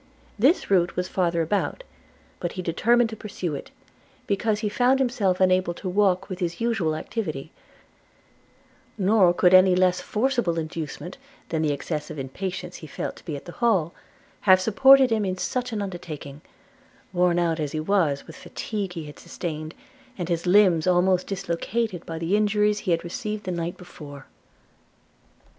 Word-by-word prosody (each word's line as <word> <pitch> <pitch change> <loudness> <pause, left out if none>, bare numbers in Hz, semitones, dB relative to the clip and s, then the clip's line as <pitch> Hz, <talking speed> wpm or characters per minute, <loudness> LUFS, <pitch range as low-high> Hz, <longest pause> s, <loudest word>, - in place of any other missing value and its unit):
This 270 - +3
route 175 -3 +3
was 180 0 -1
farther 170 -3 0
about; 205 - -1 0.6
but 175 - -3
he 185 - -5
determined 230 +7 +2
to - - -5
pursue 195 -6 -5
it, 140 - -6 0.6
because 210 +1 0
he 215 - 0
found 250 +5 +3
himself 225 -8 +1
unable 185 -2 +2
to 190 - -7
walk 190 0 +2
with 185 -2 -6
his 170 -2 -3
usual 220 -10 0
activity; 155 -5 -4 1.5
nor 195 -2 +4
could 180 +1 +3
any 185 0 +7
less 180 0 +2
forcible 235 -7 0
inducement 160 - -5 0.3
than 160 -1 -1
the 155 -2 +1
excessive 150 +1 -4
impatience 180 +6 -5
he 155 - -10
felt - - -5
to - - -16
be 160 -4 -4
at 140 - -9
the 175 - -8
Hall, 190 -9 +2 0.6
have 185 0 +8
supported 260 +6 +6
him 220 -2 +1
in 185 -1 -2
such 250 +6 -2
an 210 -2 -2
undertaking, 155 -6 -7 0.7
worn 175 -1 +2
out 170 -2 +1
as 150 -2 -2
he 155 - -3
was 155 -5 +1
with - - -12
the - - -13
fatigue 200 -4 -4
he 165 -3 -6
had 150 - -11
sustained, 155 -2 -6 0.4
and 175 -2 -4
his 170 +1 -1
limbs 180 -4 +5
almost 180 0 +3
dislocated 195 +1 -2
by 165 - -5
the 165 +4 0
injuries 210 0 +2
he - - -5
had 165 -1 +1
received 215 +3 -4
the 185 - -3
night 170 0 -3
before. 145 -6 -11
185 Hz, 165 wpm, -25 LUFS, 165-210 Hz, 1.5 s, have